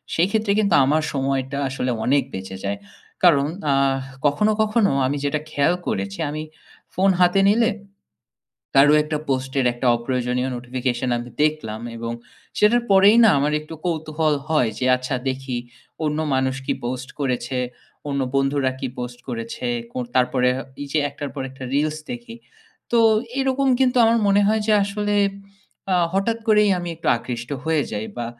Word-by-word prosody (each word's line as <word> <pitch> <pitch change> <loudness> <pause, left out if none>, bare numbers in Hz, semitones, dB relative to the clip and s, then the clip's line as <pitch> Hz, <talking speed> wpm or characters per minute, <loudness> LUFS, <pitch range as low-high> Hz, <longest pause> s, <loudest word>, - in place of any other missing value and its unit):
সেক্ষেত্রে 200 +5 +1
কিন্তু 200 -4 +2
আমার 155 +3 +2
সময়টা 135 0 -1
আসলে 130 -1 -2
অনেক 140 +1 +3
বেঁচে 95 0 -6
যায়। 100 0 -2 0.5
কারণ 145 -6 +5 0.3
আহ 135 -1 +2 0.3
কখনো, 145 +10 +3
কখনো 215 -1 +2
আমি 140 +3 -1
যেটা 145 +1 0
খেয়াল 145 +5 +2
করেছি, 100 0 -3
আমি 155 +1 -4 0.5
ফোন 190 +2 +3
হাতে 180 +2 +4
নিলে 230 +3 +3 1.1
কারো 145 +2 +7
একটা 150 0 -3
পোস্টের 130 0 0
একটা 120 +2 -4
অপ্রয়োজনীয় 125 +1 -1
নোটিফিকেশন 125 +1 -2
আমি 120 +1 -7
দেখলাম 150 -9 -1 0.2
এবং 115 0 -4 0.5
সেটার 235 +3 +4
পরেই 200 +3 +6
না - - +7
আমার 145 +2 +1
একটু 155 +1 -10
কৌতূহল 155 -2 0
হয় 150 -8 +2
যে, 125 - -2
আচ্ছা 130 +2 -4
দেখি 130 -1 -3 0.5
অন্য 150 0 -1 0.2
মানুষ 130 0 0
কি - - +1
পোস্ট 130 +1 -4
করেছে? 130 -1 -2 0.5
অন্য 140 -1 -1
বন্ধুরা 135 -1 +1
কি 135 - -2
পোস্ট 125 0 -5
করেছে? 115 0 -5 0.3
কোন 125 - -3
তারপরে 125 0 +3 0.3
এই - - -5
যে 155 - +2
একটার 145 0 -6
পর 140 - -4
একটা 130 0 -9
রিলস 155 +2 0
দেখি, 240 -1 -7 0.6
তো 235 - +4 0.4
এরকম 270 0 +1
কিন্তু 255 -1 +3
আমার 230 +1 +4
মনে 200 +1 +4
হয় 215 +1 +2
যে 220 - +3
আসলে 205 +1 -2 0.8
আ - - +4 0.2
হঠাৎ 225 +4 +1
করেই 210 -1 +5
আমি 175 0 -5
একটু 165 - -9
আকৃষ্ট 120 +1 -6
হয়ে 160 -2 +1
যাই 105 +1 -3
বা 120 -1 -3
140 Hz, 160 wpm, -22 LUFS, 130-190 Hz, 1.1 s, কারো